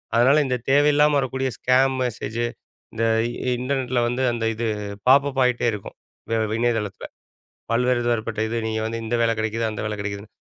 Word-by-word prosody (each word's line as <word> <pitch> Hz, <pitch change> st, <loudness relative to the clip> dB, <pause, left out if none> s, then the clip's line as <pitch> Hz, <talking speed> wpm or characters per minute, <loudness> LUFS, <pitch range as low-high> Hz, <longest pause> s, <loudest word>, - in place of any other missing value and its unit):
அதனால 130 Hz, +5 st, +5 dB
இந்த 130 Hz, -1 st, 0 dB
தேவையில்லாம 145 Hz, +1 st, +4 dB
வரக்கக்கூடிய 130 Hz, 0 st, -1 dB
ஸ்கேம் 130 Hz, +1 st, +3 dB
மெசேஜ் 115 Hz, -1 st, -3 dB, 0.5 s
இந்த 115 Hz, -, -2 dB, 0.6 s
இன்டர்நெட் 130 Hz, 0 st, -2 dB
ல -, -, +4 dB
வந்து 125 Hz, +2 st, -1 dB
அந்த 115 Hz, -1 st, -2 dB
இது 115 Hz, +1 st, -3 dB, 0.4 s
பாப்பப் 140 Hz, 0 st, +4 dB
ஆகிட்டே 125 Hz, -1 st, +1 dB
இருக்கும். 105 Hz, -, -8 dB, 0.4 s
வே 115 Hz, -, +2 dB, 0.2 s
இணையதளத்தில. 115 Hz, -4 st, -1 dB, 0.7 s
பல்வேறு 125 Hz, +1 st, +2 dB
தரப்பட்ட 110 Hz, -1 st, -2 dB
இது 115 Hz, +1 st, -2 dB
நீங்க 110 Hz, 0 st, -2 dB
வந்து 115 Hz, +1 st, -3 dB
இந்த 120 Hz, +2 st, -1 dB
வேலை 115 Hz, 0 st, +2 dB
கெடைக்குது, 110 Hz, +1 st, -1 dB
அந்த 105 Hz, -, -5 dB
வேலை 105 Hz, 0 st, -3 dB
கெடைக்குதுன்னு. 100 Hz, 0 st, -6 dB
120 Hz, 160 wpm, -23 LUFS, 110-130 Hz, 0.7 s, அதனால